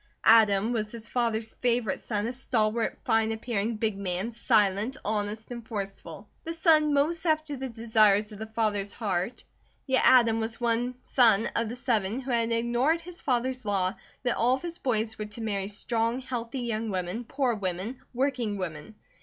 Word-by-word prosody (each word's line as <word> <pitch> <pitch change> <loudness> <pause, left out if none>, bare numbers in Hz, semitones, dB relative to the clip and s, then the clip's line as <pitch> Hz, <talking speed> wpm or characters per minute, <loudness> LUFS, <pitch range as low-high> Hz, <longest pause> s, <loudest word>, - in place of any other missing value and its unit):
Adam 220 0 +5
was 215 -2 -2
his 230 -1 -7
father's 230 -2 -1
favourite 240 -4 0
son, 210 -2 -2
a 240 - -2
stalwart, 230 -3 0
fine 225 0 +2
appearing, 225 -1 -2
big 215 -2 -1
man, 195 +3 -3
silent, 215 +2 +1
honest, 215 +2 -2
and 235 -2 -7
forceful; 195 -3 -6 0.2
the 330 - -4
son 320 -2 +4
most 310 +4 +2
after 310 -3 0
the 265 0 -5
desires 220 -2 +3
of 210 - -10
the 220 - -5
father's 215 -3 -1
heart, 200 0 -2 0.4
yet 260 -1 +2
Adam 230 -3 +6
was 225 0 -3
the - - -10
one 240 +2 0
son 225 -4 +4
of 230 -1 0
the 240 - -5
seven 235 -4 0
who 265 0 -5
had 230 -1 +1
ignored 240 +8 +1
his 350 +1 -8
father's 255 0 0
law 195 -3 0 0.3
that 245 -2 0
all 245 +3 +3
of 265 - -9
his 340 -1 -5
boys 220 -3 0
were 215 - -2
to 210 +2 -10
marry 200 -3 -2
strong, 230 +3 0
healthy 250 -1 -4
young 225 -2 -2
women, 185 +4 -3
poor 260 +1 0
women, 200 +4 -4
working 250 -5 -1
women. 165 +1 -6
230 Hz, 180 wpm, -28 LUFS, 210-250 Hz, 0.4 s, Adam